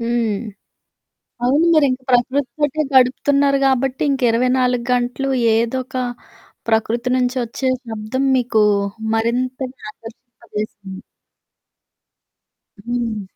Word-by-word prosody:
హ్మ్. 235 Hz, -1 st, 0 dB, 1.2 s
అవును. 285 Hz, +7 st, +3 dB
మీరింక 280 Hz, -5 st, +3 dB
ప్రకృతితోటే 275 Hz, +4 st, +1 dB
గడుపుతున్నారు 275 Hz, +2 st, +3 dB
గాబట్టి, 265 Hz, 0 st, +1 dB
ఇంక 270 Hz, -, -2 dB
24 250 Hz, 0 st, +1 dB
గంటలు 250 Hz, +2 st, -1 dB, 0.3 s
ఏదో 235 Hz, +3 st, 0 dB
ఒక 265 Hz, -, -14 dB, 0.7 s
ప్రకృతి 225 Hz, +2 st, 0 dB
నుంచి 250 Hz, 0 st, 0 dB
ఒచ్చే 260 Hz, +3 st, -2 dB, 0.2 s
శబ్దం 225 Hz, +3 st, -3 dB
మీకు 240 Hz, -3 st, +1 dB, 0.5 s
మరింతగా 250 Hz, +3 st, -2 dB
ఆదర్శంపజేసింది. 215 Hz, -4 st, -9 dB, 1.8 s
హ్మ్. 230 Hz, -2 st, -3 dB
250 Hz, 85 wpm, -19 LUFS, 230-265 Hz, 1.8 s, అవును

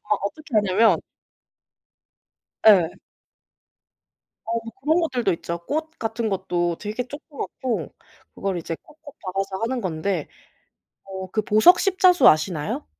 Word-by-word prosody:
아 210 Hz, -1 st, 0 dB
어떻게 290 Hz, +6 st, -6 dB
하냐면 210 Hz, +1 st, +4 dB, 1.7 s
예. 185 Hz, -6 st, +6 dB, 1.5 s
어 230 Hz, +1 st, -1 dB, 0.2 s
그런 315 Hz, +5 st, +3 dB
것들도 245 Hz, -, 0 dB
있죠. 170 Hz, +1 st, -5 dB
꽃 315 Hz, +2 st, -2 dB
같은 225 Hz, 0 st, -2 dB
것도 175 Hz, -3 st, -1 dB
되게 215 Hz, +4 st, -4 dB
조그맣고 275 Hz, -3 st, -5 dB, 0.4 s
그걸 195 Hz, -2 st, -2 dB
이제 165 Hz, 0 st, -5 dB
콕콕 300 Hz, -2 st, -16 dB
박아서 195 Hz, 0 st, -3 dB
하는 245 Hz, +2 st, -1 dB
건데 175 Hz, -3 st, -2 dB, 0.8 s
어 190 Hz, -1 st, -7 dB
그 215 Hz, -, +1 dB
보석 215 Hz, -, +6 dB
십자수 370 Hz, -2 st, +5 dB
아시나요? 155 Hz, -, +2 dB
210 Hz, 235 characters per minute, -23 LUFS, 185-260 Hz, 1.7 s, 예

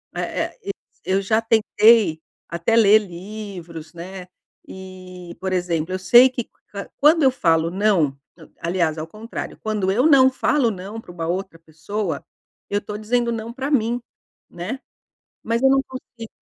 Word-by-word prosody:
Eh -, -, -2 dB
eh, -, -, -10 dB
eu 400 Hz, -, -1 dB, 0.5 s
eu -, -, +1 dB
já 220 Hz, +3 st, +2 dB
tentei 220 Hz, -6 st, +4 dB, 0.3 s
até 170 Hz, +7 st, 0 dB
ler 215 Hz, -1 st, +7 dB
livros, 180 Hz, -4 st, -9 dB
né, 180 Hz, +2 st, -8 dB, 0.4 s
e, 185 Hz, -2 st, -10 dB
por 190 Hz, 0 st, -2 dB
exemplo, 175 Hz, -1 st, -1 dB
eu 185 Hz, -, -2 dB
sei 240 Hz, +8 st, +7 dB
que, 245 Hz, -2 st, -5 dB, 0.5 s
quando 310 Hz, +3 st, +5 dB
eu 265 Hz, -, +6 dB
falo 165 Hz, -7 st, +2 dB
não 185 Hz, -9 st, +2 dB, 0.4 s
aliás, 170 Hz, -2 st, 0 dB
ao 155 Hz, +1 st, -5 dB
contrário, 215 Hz, +6 st, -7 dB
quando 210 Hz, -3 st, -1 dB
eu 245 Hz, +8 st, +2 dB
não 265 Hz, -3 st, +7 dB
falo 260 Hz, -1 st, +1 dB
não 200 Hz, +4 st, -7 dB
para 200 Hz, -, -15 dB
uma 165 Hz, -2 st, -5 dB
outra 185 Hz, -1 st, -3 dB
pessoa, 165 Hz, +6 st, -5 dB, 0.4 s
eu 205 Hz, 0 st, +1 dB
estou 210 Hz, 0 st, -7 dB
dizendo 235 Hz, +2 st, 0 dB
não 230 Hz, +1 st, -5 dB
pra 270 Hz, +3 st, -4 dB
mim, 240 Hz, -2 st, +1 dB, 0.5 s
né? 195 Hz, +10 st, -5 dB, 0.6 s
Mas 230 Hz, +3 st, -1 dB
eu 265 Hz, -, +6 dB
não 270 Hz, 0 st, +4 dB
consigo, 250 Hz, -3 st, -10 dB
205 Hz, 155 wpm, -22 LUFS, 175-230 Hz, 0.6 s, ler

